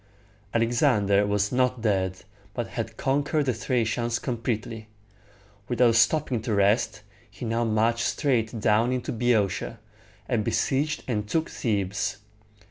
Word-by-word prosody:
Alexander 105 -3 +2
was 105 0 +1
not 125 -2 +1
dead, 95 -4 0 0.3
but 120 -2 -3
had 115 - -5
conquered 145 +2 +1
the 130 - +1
Thracians 115 0 0
completely. 115 -2 -3 0.8
Without 120 -1 +3
stopping 120 +1 +2
to 110 -1 -1
rest, 100 +2 +2 0.3
he 110 - -8
now 115 +1 0
marched 115 +2 +1
straight 120 -6 0
down 110 +2 +3
into 125 -1 -2
Boeotia, 115 -2 0 0.5
and 120 -4 0
besieged 145 +8 0
and 105 -4 -2
took 160 +4 0
Thebes. 100 -2 -1
115 Hz, 125 wpm, -26 LUFS, 105-125 Hz, 0.8 s, Without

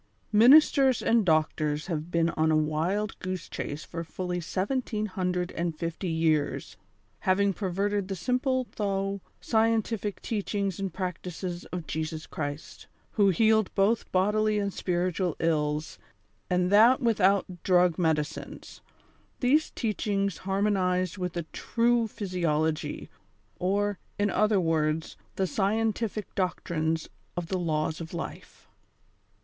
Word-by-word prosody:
Ministers 265 +3 +6
and 230 -1 +3
doctors 155 -3 +1
have 160 -2 -3
been 170 -1 +2
on 160 0 +1
a 155 - +3
wild 165 +7 -1
goose 185 -2 -4
chase 145 +2 -5
for 165 0 -6
fully 180 +2 -4
seventeen 210 +5 -2
hundred 180 -2 -2
and 170 -2 -3
fifty 170 +2 -3
years, 160 -2 0 0.4
having 195 +1 +2
perverted 200 +1 -1
tlie 195 -1 -4
simple 255 - 0
though 195 -1 -1 0.2
scientific 220 -2 0
teachings 200 -3 -2
and 195 -2 -2
practices 180 0 -5
of 180 -2 -6
Jesus 160 0 -4
Christ, 145 0 -6 0.2
who 205 -2 +4
healed 220 +2 +3
both 205 +3 +2
bodily 210 +3 +2
and 200 -2 -1
spiritual 180 -1 -1
ills, 150 -2 0 0.5
and 180 0 +1
that 230 +5 +7
without 195 -6 +2
drug 180 -2 +3
medicines 155 -2 -2 0.3
— - - -36
these 285 +5 +3
teachings 200 -4 -1
harmonized 190 -2 +1
with 180 -1 -3
a 170 - -1
true 235 0 +1
physiology, 165 -7 -2 0.5
or, 200 +2 0 0.2
in 205 -1 +1
other 215 -2 +3
words, 160 -2 0 0.2
the 190 - +1
scientific 215 +2 -1
doctrines 165 -4 -1 0.3
of 175 -2 -3
the 185 - -1
Laics 155 -1 -1
of 165 +1 -7
Life. 170 - -8
185 Hz, 125 wpm, -28 LUFS, 165-210 Hz, 0.5 s, that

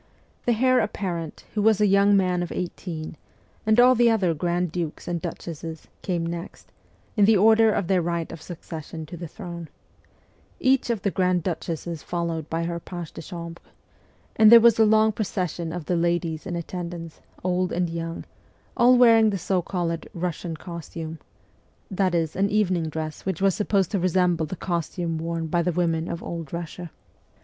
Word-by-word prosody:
The 240 - +5
heir 255 +3 +3
apparent, 175 -7 -3
who 210 - 0
was 220 -1 +4
a 210 - +4
young 200 0 +5
man 180 -2 +1
of 175 - -4
eighteen, 165 -3 -5 0.5
and 220 +2 +4
all 250 +1 +8
the 240 -1 +4
other 195 -7 +2
grand 175 +2 -1
dukes 170 -3 -4
and 170 -1 -2
duchesses, 165 -2 -7
came 175 -3 -1
next, 170 +2 -7 0.4
in 205 -2 +5
the 215 0 +5
order 220 +2 +6
of 200 - 0
their 185 -1 +3
right 170 -1 -2
of 165 - -9
succession 160 -1 -8
to 160 - -9
the 170 0 -6
throne 170 -2 -8 0.9
each 260 -1 +2
of 225 -4 -1
the 200 - +1
grand 180 -2 +1
duchesses 165 -1 -4
followed 170 -3 -3
by 165 +1 -1
her 170 0 -3
page 175 -1 -7
de - - -7
chambre; 170 0 -8 0.8
then 220 -1 +8
there 235 +1 +11
was 230 -1 +5
a 220 - +7
long 220 0 +4
procession 180 -6 -3
of 175 -2 -5
the 180 - 0
ladies 170 -1 -1
in 175 - -3
atten 170 +1 -4
dance, 165 -2 -9 0.2
old 180 0 0
and 180 0 0
young, 165 0 -5 0.5
all 245 +1 +6
wearing 225 -3 +6
the 200 - -1
so 185 +1 0
called 170 -2 -3
Russian 170 -1 -3
costume 165 -1 -7 0.7
that 190 -2 +1
is, 160 -2 0
an 195 +2 +1
evening 185 -6 +1
dress 155 0 -5
which 190 -4 -2
was 195 -1 +3
supposed 200 -2 +1
to 200 - +1
resemble 180 -2 +2
the 185 - -5
costume 170 -2 -2
worn 165 0 -3
by 170 +2 +1
the 180 - 0
women 165 -1 0
of 170 0 -5
Old 165 -4 -6
Russia. 170 +1 -6
175 Hz, 180 wpm, -25 LUFS, 165-195 Hz, 0.9 s, there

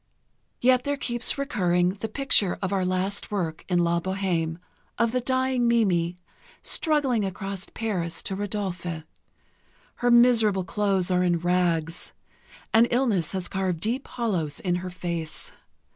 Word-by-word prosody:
Yet 255 0 +4
there 285 0 -1
keeps 240 -1 +1
recurring 180 -11 +1
the 205 +4 -4
picture 215 -7 +2
of 190 0 -2
our 190 -1 +1
last 185 +2 -1
work 170 -6 -3
in 180 - +2
"La 170 0 +2
Bohême," 175 -3 -1 0.4
of 235 -1 +2
the 250 +1 0
dying 260 -1 +1
Mimi, 180 -7 +2 0.5
struggling 285 - +1
across 195 0 -4
Paris 180 -7 -2
to 190 - -3
Rodolphe. 190 -5 -3 0.9
Her 245 - +1
miserable 235 -5 +5
clothes 195 -1 0
are 180 0 +3
in 175 -1 +2
rags, 170 -1 0 0.6
and 225 +2 +6
illness 230 - +1
has 185 -2 -2
carved 185 -3 -2
deep 235 - -2
hollows 180 - -2
in 175 -1 0
her 185 +1 -5
face. 170 -3 -4
190 Hz, 140 wpm, -26 LUFS, 175-235 Hz, 0.9 s, and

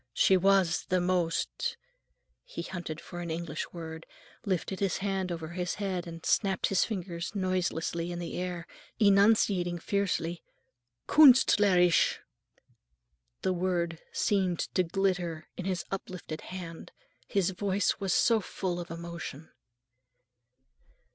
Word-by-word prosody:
She 190 - +5
was 190 -2 +3
the 185 0 +2
most—" 180 - 0 0.7
he - - -7
hunted 175 -4 -5
for 175 +1 -9
an 170 - -5
English 160 -1 -4
word, 160 -1 -8 0.4
lifted 190 -2 -2
his 195 -4 0
hand 195 -2 -2
over 165 -2 -4
his 180 0 -3
head 185 -3 -3
and 165 -1 -9
snapped 195 -3 +2
his 195 - +3
fingers 185 -3 -4
noiselessly 175 -3 -1
in 175 - -4
the 170 -1 -5
air, 175 -2 -4 0.3
enunciating 200 -4 +4
fiercely, 175 -3 -1 0.7
"künst 265 -7 +7
ler 200 -3 +4
isch!" 175 -1 +4 1.3
The 185 - +2
word 175 -2 -1
seemed 190 -4 +1
to 185 - +3
glitter 180 -3 -1
in 185 - -6
his 185 -2 -2
uplifted 180 -4 -5
hand, 175 -3 -8 0.4
his 195 -4 +1
voice 195 +1 0
was 195 -2 -1
so 230 +5 +4
full 180 -2 -3
of 175 - -6
emotion. 165 -2 -7
180 Hz, 130 wpm, -30 LUFS, 170-195 Hz, 1.3 s, künst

